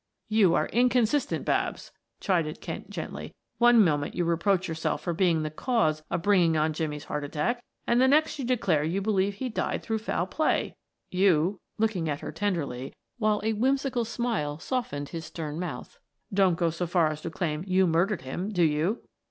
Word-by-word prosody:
"You 205 -6 +4
are - - +2
inconsistent, 250 +2 +2
Babs," - - -1 0.3
chided 165 -5 0
Kent - - -7
gently. - - -6 0.2
"One 240 -3 +7
moment 145 -3 0
you 175 - 0
reproach 180 +3 +1
yourself 160 -2 -2
for 175 - -1
being 165 -2 +2
the 155 - -3
cause 155 - +1
of 165 - -2
bringing 180 -5 +4
on 155 +1 +1
Jimmie's 150 -2 -3
heart 150 0 -4
attack, 165 - -2 0.2
and 240 +1 +3
the 260 - +6
next 300 +2 +3
you - - -2
declare 200 -11 +1
you 170 +5 0
believe 200 -1 +1
he 260 +5 -3
died 235 - -2
through 220 -1 -1
foul 195 -5 -1
play. 310 +11 0 0.4
You," 185 0 +3 0.2
looking 210 -7 0
at 145 -1 -3
her - - -5
tenderly, 150 -11 -3 0.2
while 215 -2 +2
a 220 +1 +1
whimsical 260 +2 +1
smile 225 -11 -2
softened 155 - -3
his 165 -2 -6
stern 155 -1 -5
mouth, 180 - -6 0.3
"don't 190 -3 +4
go 170 -1 +1
so 170 +2 -3
far 170 -2 +3
as 155 0 -6
to 170 - -4
claim 160 -1 -2
you 185 0 +4
murdered 175 +1 +1
him, 175 +10 -4
do 180 -5 +1
you?" 160 +8 +1
180 Hz, 185 wpm, -27 LUFS, 160-220 Hz, 0.4 s, One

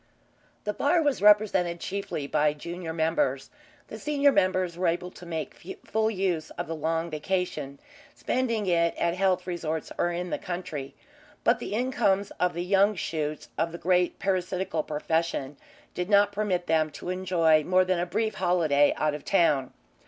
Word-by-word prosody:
The 210 - -2
bar 295 +9 +2
was 290 -8 0
represented 200 -5 +4
chiefly 195 -7 -4
by 150 +1 +2
junior 170 +2 -6
members. 160 -5 0 0.4
The 220 - -8
senior 285 +2 +3
members 185 -5 +1
were 180 +1 0
able 175 +2 -1
to 175 - -12
make 165 +2 -6
full 220 0 +1
use 185 -6 -1
of - - -2
the 165 - -4
long 165 +2 -1
vacation, 155 -4 -2 0.4
spending 230 -4 -1
it 170 -2 +2
at 170 - +1
health 185 -1 +1
resorts 160 -3 -3
or 175 - +2
in 175 +1 -4
the - - -1
country, 175 -6 -5 0.5
but - - +3
the 205 - -4
incomes 210 -5 +1
of 180 -1 +1
the 175 - -2
young 200 +2 +3
shoots 155 -3 -3
of 165 - 0
the 170 - -6
great 180 0 +1
parasitical 185 -3 -1
profession 155 -2 -2 0.4
did 180 +1 -3
not 205 -1 +5
permit 200 -4 -1
them 160 -1 +2
to 175 - -7
enjoy 170 -4 +3
more 185 +3 +3
than 185 -1 +1
a 175 - -1
brief 215 +4 -1
holiday 165 -6 +2
out 155 -1 +1
of 150 - -6
town. 150 -9 +2
180 Hz, 165 wpm, -27 LUFS, 160-195 Hz, 0.5 s, not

